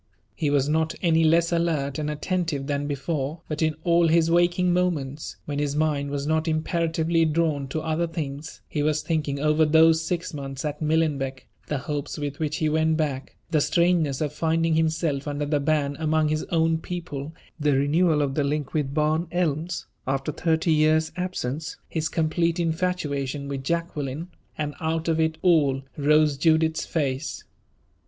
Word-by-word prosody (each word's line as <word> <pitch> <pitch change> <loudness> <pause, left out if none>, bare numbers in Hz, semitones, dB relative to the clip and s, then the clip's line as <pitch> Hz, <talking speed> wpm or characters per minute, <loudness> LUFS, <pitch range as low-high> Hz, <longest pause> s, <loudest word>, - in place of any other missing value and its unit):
He 150 - -1
was 140 -1 +2
not 160 +1 +1
any 165 -2 +4
less 170 +2 +3
alert 155 -5 0
and 150 0 -2
attentive 155 -2 -2
than 145 0 -2
before, 145 +2 -3
but 155 +1 -4
in 155 -1 +1
all 170 -1 +4
his 165 0 +3
waking 175 +1 +3
moments, 155 -6 -1
when 145 -1 -3
his 145 -1 -1
mind 150 -2 0
was 140 0 -3
not 160 +1 0
imperatively 165 +1 +1
drawn 155 -3 +1
to 155 +4 -3
other 160 +2 0
things, 150 -2 -6
he 150 - -2
was 150 +1 +1
thinking 150 -4 -1
over 155 +2 +3
those 160 +1 +5
six 170 0 -3
months 135 -1 -5
at 150 +1 -4
Millenbeck 150 -4 0 0.2
the 150 - -1
hopes 145 +1 -4
with 145 -1 -4
which 155 0 -1
he 160 -4 +1
went 160 +1 +2
back; 140 -4 -2 0.2
the 155 - +3
strangeness 170 -5 +2
of 150 -1 -1
finding 165 +1 +1
himself 160 -3 0
under 145 0 -2
the 145 0 +1
ban 145 -1 0
among 155 -1 +2
his 155 0 -1
own 165 -1 +1
people; 160 -4 -6 0.2
the 145 -1 +2
renewal 150 +2 +3
of 135 -1 -1
the 145 - +1
link 145 0 -2
with 145 -2 -1
Barn 155 +2 +1
Elms, 170 -1 -1 0.2
after 135 +2 -1
thirty 160 +1 +1
years' 155 +1 +3
absence; 165 -4 -3
his 160 -1 -2
complete 165 +1 0
infatuation 155 -5 -1
with 135 -1 -4
Jacqueline 160 0 -3 0.3
and, 150 -1 -2
out 160 +1 -1
of 165 -1 +1
it 160 0 +1
all, 145 -7 +3
rose 150 0 +3
Judith's 160 +1 +2
face. 140 -2 -2
155 Hz, 170 wpm, -25 LUFS, 145-165 Hz, 0.3 s, those